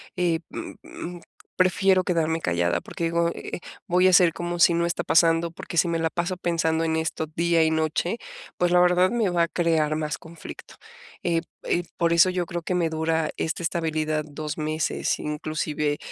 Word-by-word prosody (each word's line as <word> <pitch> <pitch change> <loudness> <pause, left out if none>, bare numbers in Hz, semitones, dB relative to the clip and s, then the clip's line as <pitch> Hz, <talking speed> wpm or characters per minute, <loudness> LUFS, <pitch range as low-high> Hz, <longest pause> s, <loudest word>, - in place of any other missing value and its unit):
eh, 175 -3 +1
mm - - -7
mm, 175 +1 -8 0.4
prefiero 185 0 +3
quedarme 165 -2 0
callada, 85 - 0
porque 170 - -5
digo, 170 0 +1
eh: - - -6 0.3
"Voy 180 +1 +4
a 185 - +4
ser 180 -2 +6
como 175 +1 -4
si 170 0 +6
no 170 0 +1
está 170 - -1
pasando, 165 0 +3
porque 170 +2 -9
si 175 - +4
me 170 -1 0
la 165 -1 -1
paso 175 +1 -2
pensando 165 -2 0
en 160 -1 0
esto 160 0 -2
día 170 -1 +3
y 160 - +2
noche, 160 +6 0 0.4
pues, 175 0 +1
la 180 - +5
verdad 180 +1 +4
me 230 -4 +1
va 175 -1 +2
a - - +1
crear 160 -3 +1
más 155 -1 -3
conflicto". 165 0 -11 0.5
Eh 170 -1 +1 0.2
eh, 175 - 0
por 170 -1 +2
eso 170 +2 +6
yo 180 -1 -1
creo 170 +1 -4
que 180 +2 -2
me 170 -2 +1
dura 160 0 0
esta 165 +2 -2
estabilidad 155 -2 -1
2 150 0 -6
meses, 155 +1 -1
inclusive, 150 -1 -2
165 Hz, 190 wpm, -25 LUFS, 160-175 Hz, 0.5 s, ser